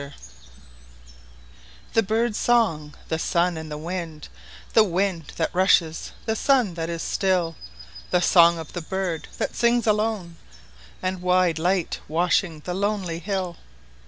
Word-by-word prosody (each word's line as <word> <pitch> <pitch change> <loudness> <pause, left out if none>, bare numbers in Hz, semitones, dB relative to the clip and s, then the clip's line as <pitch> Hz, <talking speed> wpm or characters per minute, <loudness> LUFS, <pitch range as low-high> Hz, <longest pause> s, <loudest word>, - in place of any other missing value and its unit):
html 140 0 -9 1.8
THE 225 - +4
BIRD'S 220 +2 0
song, 165 -12 +1
the 160 - -1
sun, 175 +1 +1
and 160 -1 -7
the 150 - -5
wind—The 170 +5 -2
wind 185 -4 -1
that 165 - -1
rushes, 175 -3 +2
the 220 - 0
sun 250 -7 +2
that 165 0 -4
is 170 -1 -3
still, 180 -4 0 0.5
The 180 - +3
song 170 -1 +5
of 160 -2 -8
the 175 - -4
bird 180 -1 -3
that - - -2
sings 235 0 +2
alone, 210 -5 0 0.7
And 185 0 -2
wide 180 -3 +2
light 180 +1 0
washing 165 0 +1
the 180 - -4
lonely 195 -3 -1
hill! 185 -1 -3
180 Hz, 135 wpm, -24 LUFS, 165-195 Hz, 1.8 s, song